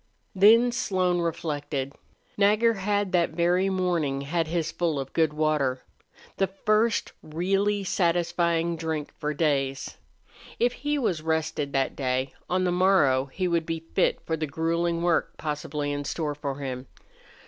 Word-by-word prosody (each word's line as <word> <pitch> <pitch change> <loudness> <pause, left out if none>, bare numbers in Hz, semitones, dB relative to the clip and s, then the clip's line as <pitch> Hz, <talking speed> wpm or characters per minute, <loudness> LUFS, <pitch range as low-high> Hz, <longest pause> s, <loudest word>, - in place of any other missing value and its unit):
Then 225 +5 +6
Slone 185 -6 0
reflected. 145 -4 -3 0.4
Nagger 210 +3 +4
had 205 -1 -1
that 175 -2 +2
very 175 +3 +2
morning 175 -7 0
had 165 +3 -1
his 165 -1 -1
fill 165 -4 -1
of 135 -1 -6
good 160 -2 +2
water 150 -4 0 0.5
the 195 - +2
first 215 +3 +1
really 195 +6 0
satisfying 170 -2 +1
drink 160 -2 -3
for 150 - -1
days. 135 -3 -1 0.6
If 240 +1 +2
he 295 +4 -2
was 185 - 0
rested 155 -2 -1
that 135 -1 0
day, 130 0 -1 0.2
on 185 +1 +1
the 180 - +1
morrow 175 -8 +3
he 185 +7 -2
would 170 -2 0
be 165 0 -4
fit 185 - +2
for 160 - -1
the 155 -1 -3
grueling 170 +3 -1
work 175 -2 +1
possibly 150 -1 -3
in 145 0 -3
store 150 +1 -2
for 145 -2 -4
him. 130 -2 -5
165 Hz, 150 wpm, -26 LUFS, 145-185 Hz, 0.6 s, Then